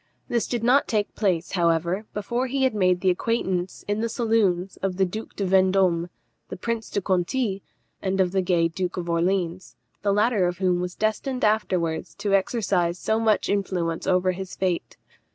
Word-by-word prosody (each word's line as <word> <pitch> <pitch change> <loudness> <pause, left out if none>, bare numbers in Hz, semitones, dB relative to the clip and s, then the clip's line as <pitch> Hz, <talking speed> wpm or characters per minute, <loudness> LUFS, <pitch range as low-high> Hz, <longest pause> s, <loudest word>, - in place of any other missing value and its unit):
This 235 -2 0
did 240 -2 -2
not 255 +4 +4
take 210 -2 -1
place, 180 -5 0
however, 170 +3 +1
before 235 +5 -2
he 265 +1 0
had 260 - +3
made 185 -3 +2
the 185 - +4
acquaintance, 185 -3 -2
in 205 +1 0
the 230 - -1
saloons, 210 -6 +1
of 190 -2 -2
the 190 - +3
Duke 215 +5 -7
de 200 - -2
Vendôme, 185 -2 +3 0.4
the - - -6
Prince 230 +3 -3
de 200 - -1
Conti, 190 +3 0 0.4
and 190 0 -1
of 185 -2 +3
the 190 0 +1
gay 175 -2 +2
Duke 180 +2 -4
of 175 -1 -3
Orleans, 175 +1 -1 0.3
the 200 - +1
latter 210 -2 +3
of 175 0 -3
whom 180 -2 +1
was 180 0 -4
destined 235 +4 -1
afterwards 180 -7 0
to 200 -1 -2
exercise 190 -4 +1
so 220 +4 0
much 220 -2 +2
influence 180 -5 -1
over 185 0 +3
his 185 0 -6
fate. 185 -2 -2
190 Hz, 180 wpm, -25 LUFS, 180-215 Hz, 0.4 s, not